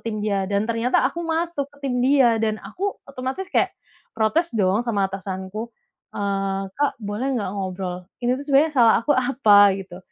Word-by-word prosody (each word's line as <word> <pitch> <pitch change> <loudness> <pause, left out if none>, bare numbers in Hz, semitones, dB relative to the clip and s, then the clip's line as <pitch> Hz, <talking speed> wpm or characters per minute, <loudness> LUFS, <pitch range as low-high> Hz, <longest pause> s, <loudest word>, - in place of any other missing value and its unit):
tim 215 - -3
dia, 200 -2 0
dan 200 +1 +1
ternyata 230 +2 +1
aku 335 - -6
masuk 330 -2 -1
ke 285 - -20
tim 250 - -1
dia. 260 -4 +4
Dan 215 -1 0
aku 400 +2 -4
otomatis 270 +8 -5
kayak - - +1 0.4
protes 310 +11 +1
dong 195 0 +2
sama 200 -4 +1
atasanku, 190 +3 -6 0.4
eee, 195 -1 -1
“Kak, 290 0 +1
boleh 210 +5 -3
nggak 200 - -3
ngobrol? 185 -2 -4 0.2
Ini 245 +1 +1
tuh 285 - -7
sebenarnya 290 +3 +4
salah 235 -4 +6
aku 290 - +2
apa?” 220 -6 +5
Gitu. 185 -2 -9
225 Hz, 170 wpm, -23 LUFS, 195-275 Hz, 0.4 s, salah